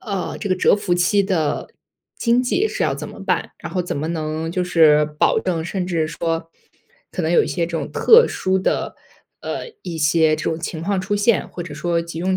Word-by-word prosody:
呃， 200 -5 -4
这 205 - -4
个 185 - +1
蛰 - - +4
伏 205 -3 -2
期 175 +3 +3
的 160 -7 -1 0.5
经 235 +1 +2
济 360 - +1
是 - - -3
要 - - +1
怎 - - -6
么 - - -10
办？ - - -1
然 - - -8
后 185 - 0
怎 180 - -3
么 150 +3 -3
能 160 0 -3
就 180 +1 -1
是 155 -4 +5 0.2
保 - - +4
证， 170 -4 -2
甚 180 +1 -3
至 165 -3 -1
说 165 +1 -3 0.6
可 180 - -3
能 160 - 0
有 175 - +4
一 - - -5
些 175 - -1
这 165 -1 -3
种 - - -4
特 470 +1 +6
殊 190 0 0
的， 190 - -1 0.4
呃， - - -5
一 175 -3 -5
些 155 0 +3
这 155 - -5
种 160 - -1
情 165 -1 -5
况 195 +2 0
出 195 +2 -2
现， 205 0 +2
或 175 - -7
者 165 - -9
说 170 +3 -1
急 165 -1 -7
用 185 +2 0
175 Hz, 245 characters per minute, -21 LUFS, 160-190 Hz, 0.6 s, 特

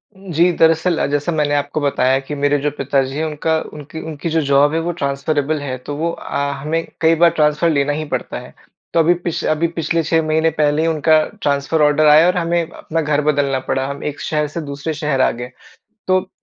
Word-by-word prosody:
उम, 190 -2 -11
जी। 170 +3 +3
दरअसल 165 +1 +3
अ, - - +1
जैसा 145 +4 -1
मैंने 150 -2 0
आपको 145 +1 -2
बताया 135 -2 +2
कि 135 +2 -6
मेरे 145 +1 +1
जो 145 +1 -1
पिताजी 135 0 0
हैं 160 - -1
उनका 160 +1 -1 0.2
उनकी, 150 +1 -9
उनकी 160 +1 -5
जो 160 0 +1
जॉब 145 +2 +4
है 165 - +1
वो - - +1
ट्रांसफ़रेबल 145 +2 -1
है। 130 -3 -4
तो 145 +3 -7
वो 165 +2 -1
अ, 140 -3 -3
हमें 160 +3 -1 0.2
कई 165 0 +4
बार 170 - +8
ट्रांसफ़र 150 +2 +3
लेना 145 -2 +1
ही 155 +1 -3
पड़ता - - -5
है। - - -13 0.4
तो 165 - +3
अभी 165 +2 +5
पिछ 170 - -2
अभी 170 +2 +1
पिछले 165 0 0
6 160 +1 +2
महीने 160 +1 +2
पहले 150 +1 +2
ही 165 - +1
उनका 155 0 +3 0.2
ट्रांसफ़र 145 +2 0
ऑर्डर 150 +1 +4
आया 150 +2 +7
और 180 0 +1
हमें 170 0 +1
अपना 165 0 -4
घर 150 -1 +1
बदलना 140 -2 0
पड़ा। 130 0 0
हम 140 0 -6
एक 150 -1 -4
शहर 150 -1 -1
से 170 - -2
दूसरे 145 +1 -5
शहर 150 -4 -1
आ - - +4
गए, 125 +1 -7 0.6
तो 185 0 +2
150 Hz, 225 wpm, -18 LUFS, 145-160 Hz, 0.6 s, बार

